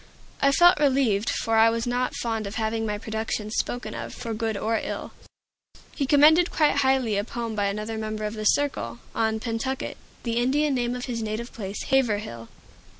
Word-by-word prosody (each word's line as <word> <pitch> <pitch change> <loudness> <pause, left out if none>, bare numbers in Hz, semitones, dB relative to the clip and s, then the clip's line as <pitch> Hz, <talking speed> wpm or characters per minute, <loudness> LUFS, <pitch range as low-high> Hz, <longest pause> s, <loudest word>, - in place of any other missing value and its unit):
I 275 - +5
felt 350 +4 +6
relieved; 260 -7 +2
for 225 0 0
I 225 +1 +7
was 230 0 -1
not 245 +1 -1
fond 225 -3 -2
of 200 - -7
having 225 0 -1
my 210 0 -2
productions 220 0 -3
spoken 245 - -3
of, - - -6
for 235 -2 -5
good 220 -1 -2
or 225 +2 0
ill. - - -5 0.8
He 275 - -2
commended 310 +5 +6
quite 305 -3 +2
highly 265 -6 +2
a 200 - +1
poem 230 0 -4
by 205 -1 0
another 210 +2 -3
member 215 0 -4
of 210 0 -2
the 215 -1 -5
Circle, 210 - +1 0.2
on 220 -1 0
"Pentucket," 235 +4 -3 0.3
the 235 -1 -1
Indian 280 +4 +2
name 245 -1 0
of 250 - -4
his 235 -3 -3
native 220 +2 -4
place, 200 -3 -5
Haverhill. 210 - 0
225 Hz, 185 wpm, -25 LUFS, 215-260 Hz, 0.8 s, I